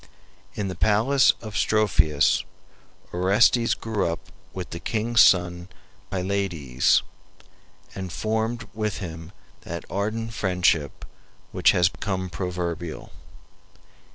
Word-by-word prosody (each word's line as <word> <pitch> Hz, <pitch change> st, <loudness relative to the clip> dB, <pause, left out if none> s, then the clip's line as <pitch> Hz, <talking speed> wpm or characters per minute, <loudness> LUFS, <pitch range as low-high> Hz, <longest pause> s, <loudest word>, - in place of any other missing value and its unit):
In 105 Hz, -, -2 dB
the 95 Hz, -, -3 dB
palace 110 Hz, +9 st, +4 dB
of 110 Hz, -1 st, -7 dB
Strophius 80 Hz, -9 st, +2 dB, 0.7 s
Orestes 105 Hz, +6 st, +3 dB
grew 110 Hz, -4 st, -2 dB
up 85 Hz, 0 st, -5 dB, 0.2 s
with 90 Hz, -2 st, -7 dB
the 85 Hz, -, -5 dB
king's 115 Hz, +4 st, +2 dB
son 90 Hz, 0 st, +3 dB, 0.4 s
Pylades, 90 Hz, -9 st, +1 dB, 0.9 s
and 95 Hz, -2 st, -6 dB
formed 110 Hz, +3 st, -2 dB
with 105 Hz, -2 st, -2 dB
him 80 Hz, -2 st, -7 dB, 0.3 s
that 85 Hz, +1 st, -7 dB
ardent 110 Hz, +3 st, -2 dB
friendship 90 Hz, -8 st, 0 dB, 0.5 s
which -, -, +3 dB
has 90 Hz, -1 st, +4 dB
become 95 Hz, -1 st, -4 dB
proverbial. 85 Hz, -3 st, -4 dB
95 Hz, 100 wpm, -24 LUFS, 85-110 Hz, 0.9 s, palace